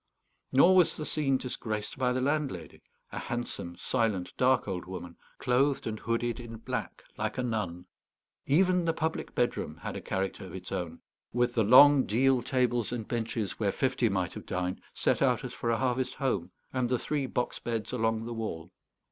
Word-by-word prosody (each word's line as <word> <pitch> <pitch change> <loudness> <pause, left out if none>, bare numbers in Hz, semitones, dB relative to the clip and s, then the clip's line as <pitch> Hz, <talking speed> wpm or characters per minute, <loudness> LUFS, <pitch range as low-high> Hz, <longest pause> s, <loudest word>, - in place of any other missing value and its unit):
Nor 170 +8 +6
was 180 -3 +4
the 155 - -4
scene 140 -4 +1
disgraced 110 -5 -4
by 125 -1 +1
the 130 +1 0
landlady, 135 - -2 0.3
a - - -4
handsome, 120 -7 -4
silent, 105 -6 0
dark 130 -3 +3
old 90 -3 -3
woman, 90 -2 -7 0.2
clothed 135 +3 +2
and 110 -1 -3
hooded 115 +1 -1
in 115 -2 -8
black 110 - -5
like - - -2
a 125 - 0
nun. 100 -7 -2 0.6
Even 180 +4 +3
the 165 - +2
public 160 0 -3
bedroom 80 -10 -1
had - - -6
a - - -5
character 95 0 -2
of 95 - -9
its 90 -1 -8
own, 90 -4 -4 0.3
with 120 0 +2
the 115 - +3
long 135 +5 +8
deal 130 +3 +3
tables 120 -2 +1
and 115 -3 -4
benches, 110 -5 -2
where 100 -3 +2
fifty 125 -2 +1
might 95 -2 -1
have - - -9
dined, 90 0 -2
set - - +1
out - - +3
as - - -5
for 115 - -3
a 115 - +2
harvest 130 0 0
home, 100 -10 -1 0.2
and 130 -2 0
the 125 - +2
three 145 +1 -2
box 125 -1 -2
beds 115 -2 -3
along 115 -2 0
the 120 - -4
wall. 90 -7 -5
120 Hz, 185 wpm, -30 LUFS, 100-130 Hz, 0.6 s, long